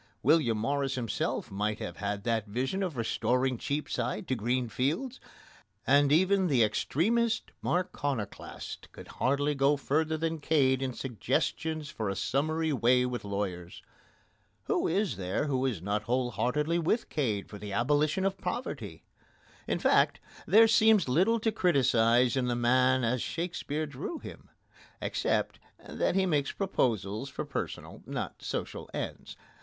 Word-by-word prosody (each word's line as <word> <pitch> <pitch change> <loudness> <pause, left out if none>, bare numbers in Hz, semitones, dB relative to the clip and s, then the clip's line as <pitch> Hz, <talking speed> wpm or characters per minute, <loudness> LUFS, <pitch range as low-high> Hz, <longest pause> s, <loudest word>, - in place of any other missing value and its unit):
William 140 -6 +4
Morris 135 +4 -1
himself 120 -3 -2
might 105 +2 -1
have 85 -5 -6
had 100 0 -3
that 115 -2 0
vision 130 - -2
of 180 -8 -2
restoring 125 +3 +1
Cheapside 130 -6 -2
to - - 0
green 120 +2 0
fields, 165 - -2 0.7
and 140 +1 +4
even 190 +4 +4
the 130 -7 +4
extremest 220 - +1
Marconoclast 145 - -3
could - - -11
hardly 140 +3 +1
go 140 +1 +3
further 155 +3 0
than 165 0 -2
Cade 135 -4 +2
in 130 -1 -2
suggestions 150 +5 -2
for 110 -7 -3
a 100 - -2
summary 155 +7 0
way 125 0 +3
with 125 -1 -3
lawyers. 100 -4 -4 0.8
Who - - 0
is 185 - 0
there 95 +8 -1
who 135 -2 0
is 105 -10 -3
not 105 +2 0
whole 125 +1 0
heartedly 150 +8 0
with 175 +8 0
Cade 110 -10 -1
for 105 - -10
the 105 0 -7
abolition 145 - +1
of 195 -1 -1
poverty? 190 +8 -5 0.6
In - - 0
fact, - - +3 0.3
there 225 +2 +7
seems 220 -5 +5
little 185 - +3
to 225 - +1
criticise 125 - +3
in 130 -2 0
the 120 - 0
man 130 +2 +3
as 120 +1 +1
Shakespeare 160 -3 -3
drew 145 - -5
him, - - -11 0.5
except - - -1 0.3
that - - -1
he 190 -1 +3
made 145 -6 +1
his - - -4
proposals 115 - -1
for - - -5
personal, - - -5
not - - -4
for - - -12
social - - -4
ends. - - -5
135 Hz, 150 wpm, -30 LUFS, 115-160 Hz, 0.8 s, there